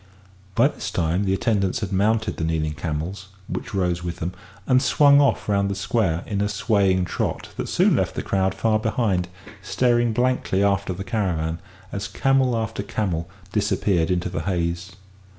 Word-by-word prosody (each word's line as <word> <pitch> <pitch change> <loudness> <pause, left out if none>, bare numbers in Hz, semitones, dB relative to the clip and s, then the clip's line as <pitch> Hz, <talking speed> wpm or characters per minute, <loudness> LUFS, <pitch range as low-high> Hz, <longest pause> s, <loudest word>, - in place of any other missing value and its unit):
By - - +5
this - - -6
time 85 +4 0
the 95 - +1
attendants 100 -2 0
had 105 -3 -3
mounted 110 +3 +1
the - - -3
kneeling 80 -1 0
camels, 80 +6 -4 0.2
which - - -5
rose 90 -2 0
with 85 -1 -3
them, 90 +1 -4 0.3
and 130 0 +4
swung 145 0 +5
off 140 - +1
round 100 -1 +1
the 100 - -2
square 95 -4 0
in 100 -2 -2
a - - +2
long, - - -1
swaying 100 -3 +2
trot - - -3
that - - -4
soon - - +3
left - - -1
the - - -3
crowd 95 -1 0
far 110 -1 +1
behind, 110 -5 0 0.3
staring 120 +3 +2
blankly 120 -4 +1
after 100 -1 +1
the 95 +2 -4
caravan 90 -7 -1 0.3
as 100 0 -3
camel 135 -3 +2
after 110 0 -3
camel 90 -5 -2 0.2
disappeared 100 -5 +1
into 90 -1 0
the 90 - -3
haze. 85 0 -2
100 Hz, 175 wpm, -23 LUFS, 90-110 Hz, 0.3 s, By